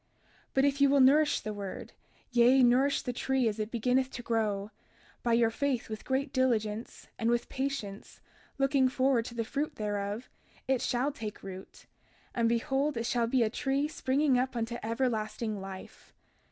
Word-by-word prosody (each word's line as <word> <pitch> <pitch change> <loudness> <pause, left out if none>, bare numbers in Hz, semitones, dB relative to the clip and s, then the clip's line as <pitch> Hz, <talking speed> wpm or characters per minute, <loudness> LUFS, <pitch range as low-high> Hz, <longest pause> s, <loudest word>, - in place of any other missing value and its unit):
32:41 - - -43 0.5
But 270 +1 +4
if 280 0 +1
ye 280 - +7
will 280 0 +4
nourish 290 +3 +5
the 215 - -4
word, 200 -2 -7 0.4
yea, 250 +2 +5
nourish 260 +4 +3
the 250 - -3
tree 265 0 +1
as 215 0 -2
it 215 0 -2
beginneth 250 +3 +1
to 240 - -6
grow, 215 -3 -1 0.5
by 235 - +1
your 230 -1 +4
faith 265 -1 -1
with 215 -1 -6
great 265 +1 -1
diligence, 230 -4 -1
and 225 - +1
with 240 0 0
patience, 260 -7 -4 0.4
looking 275 -1 +3
forward 255 -2 +2
to 240 - -8
the 230 - -1
fruit 290 +6 -3
thereof, 205 +2 -3 0.4
it 260 -2 +1
shall 250 +4 0
take 220 -6 -7
root; 190 0 -10 0.5
and 230 -1 +2
behold 270 +4 0
it 230 - -2
shall 235 -1 +1
be 245 0 +3
a 220 - +1
tree 275 +3 0
springing 275 -2 +1
up 260 0 -1
unto 235 0 -2
everlasting 220 -2 -2
life. 190 -1 -10
240 Hz, 175 wpm, -30 LUFS, 220-270 Hz, 0.5 s, ye